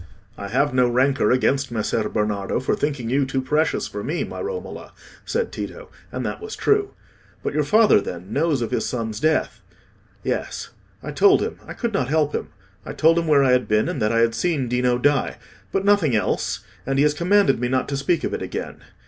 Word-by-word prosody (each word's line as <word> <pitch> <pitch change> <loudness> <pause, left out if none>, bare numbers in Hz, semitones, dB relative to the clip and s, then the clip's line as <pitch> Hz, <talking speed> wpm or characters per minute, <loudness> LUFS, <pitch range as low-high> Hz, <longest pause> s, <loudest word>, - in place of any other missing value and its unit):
"I 100 - -6
have 135 +6 +1
no 125 -1 +3
rancour 130 -1 +2
against 135 +2 +2
Messer 110 -1 -1
Bernardo 105 -2 -1
for 130 - 0
thinking 140 -6 -2
you 140 +2 +3
too 135 0 -1
precious 150 +4 0
for - - -6
me, - - -2
my - - -6
Romola," 455 +2 -6 0.3
said 475 0 -1
Tito: 485 0 -7 0.2
and - - -4
that - - -4
was 435 0 -6
true. 415 -1 +1 0.5
"But - - -2
your 150 +1 +1
father, 210 - +5
then, 90 +4 -7
knows 145 -4 +1
of 115 - -4
his - - 0
son's 110 -3 -3
death?" 155 +3 0 0.6
"Yes, - - -3 0.3
I - - -5
told 400 -1 +5
him—I - - -6
could 235 -2 -3
not 140 -10 0
help 150 0 +1
it. - - -2 0.4
I - - -7
told 165 +2 +4
him 165 - -2
where 145 -3 +5
I 130 - +4
had 125 0 +2
been, 105 0 +2
and 135 - -3
that 105 +1 +2
I 115 0 +3
had 115 0 +3
seen 150 -3 0
Dino 125 0 +1
die; 145 +3 +1 0.3
but 195 0 -1
nothing 200 - +3
else; 105 - -1 0.2
and 135 +1 -1
he 140 - +4
has 150 0 +3
commanded 180 - +3
me 125 - 0
not 130 0 0
to 140 - -2
speak 140 +5 0
of - - -2
it - - -3
again. - - -5
135 Hz, 210 wpm, -22 LUFS, 120-165 Hz, 0.6 s, father